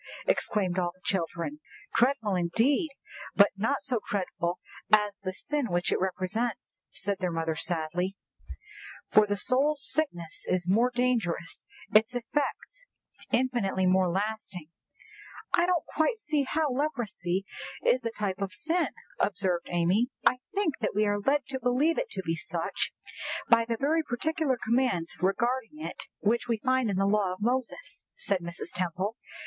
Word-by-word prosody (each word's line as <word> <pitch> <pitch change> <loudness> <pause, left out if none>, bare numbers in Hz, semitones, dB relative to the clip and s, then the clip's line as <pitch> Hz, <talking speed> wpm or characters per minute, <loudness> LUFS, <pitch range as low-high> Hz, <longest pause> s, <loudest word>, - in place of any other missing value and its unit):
exclaimed 195 - +1
all 175 -1 0
the 185 - -27
children. 190 - -2 0.3
"Dreadful 230 -5 +2
indeed, 225 - +2 0.5
but 200 0 +7
not 225 +8 0
so 255 -5 0
dreadful 180 -3 -1 0.3
as 210 -1 +4
the 190 -2 -3
sin 290 +7 -2
which 175 0 0
it - - +2
represents," 190 +4 -2
said 200 0 -1
their 180 -1 0
mother 165 -1 -1
sadly; 175 +3 0 1.0
"for 215 0 +6
the 205 0 0
soul's 275 +6 +2
sickness 175 - -1
is 180 -1 0
more 225 +7 +4
dangerous, 240 -9 -1 0.3
its 220 +4 +5
effects 295 - -2 0.5
infinitely 235 -7 +1
more 185 0 +4
lasting." 190 -4 -3 0.8
"I 345 - +4
don't 360 -3 +1
quite 315 +10 +1
see 300 -8 0
how 310 -2 +1
leprosy 225 - -1 0.4
is 255 0 +4
a 230 - 0
type 200 -3 -3
of 195 -1 -2
sin," 330 +7 +1 0.3
observed 185 -3 +1
Amy. 180 +8 +2 0.2
"I 250 - +5
think 395 -8 0
that 220 - -1
we 215 +1 +3
are 205 0 +1
led 275 +6 +2
to 265 -1 -3
believe 260 +7 +2
it - - -2
to 190 - -4
be 165 - 0
such - - -2 0.6
by 230 -1 +6
the 230 0 -1
very 310 +6 +2
particular 305 +1 0
commands 225 -8 +1
regarding 235 +8 0
it - - -5
which 230 +4 +1
we 230 -2 +1
find 255 0 +1
in 195 - 0
the 195 - +3
law 200 -2 +2
of 185 - -11
Moses," 255 - -2
said 200 - 0
Mrs. 170 0 -6
Temple. 185 +4 -1
215 Hz, 155 wpm, -29 LUFS, 185-260 Hz, 1.0 s, but